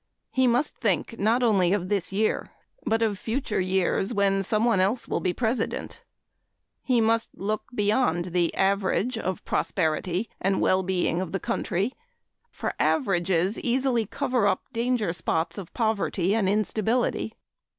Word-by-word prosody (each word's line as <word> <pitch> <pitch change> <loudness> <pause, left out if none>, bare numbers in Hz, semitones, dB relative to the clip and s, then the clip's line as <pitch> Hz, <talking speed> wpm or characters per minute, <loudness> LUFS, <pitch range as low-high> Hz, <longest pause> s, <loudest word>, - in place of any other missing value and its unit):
He 260 -1 +3
must 245 +5 +1
think 220 +1 -1
not 230 +5 +2
only 195 -6 +3
of 190 -3 -1
this 195 -3 0
year 215 +3 0 0.4
but 225 +1 +2
of 205 -4 0
future 235 -1 -2
years, 190 +4 0
when 195 -1 +2
someone 215 +2 +2
else 200 +6 +1
will - - -1
be 180 - 0
President. 235 +5 -2 0.8
He 250 -3 +2
must 225 +1 +2
look 215 +2 -2
beyond 205 -5 +1
the 175 -2 +2
average 200 +5 +1
of 190 -4 -2
the - - -27
prosperity 180 +4 -1
and 195 0 +1
well 185 0 +3
being 180 -2 0
of 185 -2 -5
the 195 - 0
country, 215 0 -1 0.6
for - - -4
averages 190 - +1
easily 245 -3 +1
cover 240 -1 0
up - - +1
danger 230 -6 0
spots 165 +1 -2
of 185 -2 -9
poverty 205 -5 0
and 210 -4 +2
instability. 220 +2 0
205 Hz, 150 wpm, -26 LUFS, 185-230 Hz, 0.8 s, He